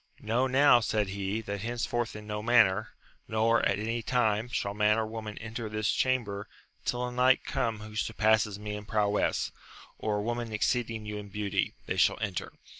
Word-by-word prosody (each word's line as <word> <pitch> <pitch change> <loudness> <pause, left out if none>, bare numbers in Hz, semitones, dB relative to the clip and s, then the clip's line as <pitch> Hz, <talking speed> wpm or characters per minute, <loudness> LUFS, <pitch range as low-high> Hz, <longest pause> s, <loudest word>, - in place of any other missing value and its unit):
Know 120 +4 +1
now, 130 -1 +6
said 105 -3 0
he, 100 +2 -2
that 100 -2 -5
henceforth 120 0 -2
in 105 0 -8
no 105 0 -4
manner, 110 -2 +4 0.4
nor 110 +1 +2
at - - +1
any 115 +3 -2
time, 110 -2 +1
shall 100 -4 -2
man 105 +1 +3
or 110 - +1
woman 110 -1 -6
enter 115 0 -5
this 110 0 0
chamber 110 -6 0 0.4
till 125 0 -1
a - - -5
knight 125 +1 +4
come 115 -6 -1
who 105 0 -9
surpasses 110 -1 +2
me 105 0 -5
in 105 0 -7
prowess, 105 -1 +1 0.5
or 105 -1 0
a - - -1
woman 120 0 -2
exceeding 115 0 0
you 105 0 -4
in 105 -1 -7
beauty; 100 -1 -1
they - - -2
shall - - +4
enter. 100 -5 -3
110 Hz, 185 wpm, -29 LUFS, 105-120 Hz, 0.5 s, now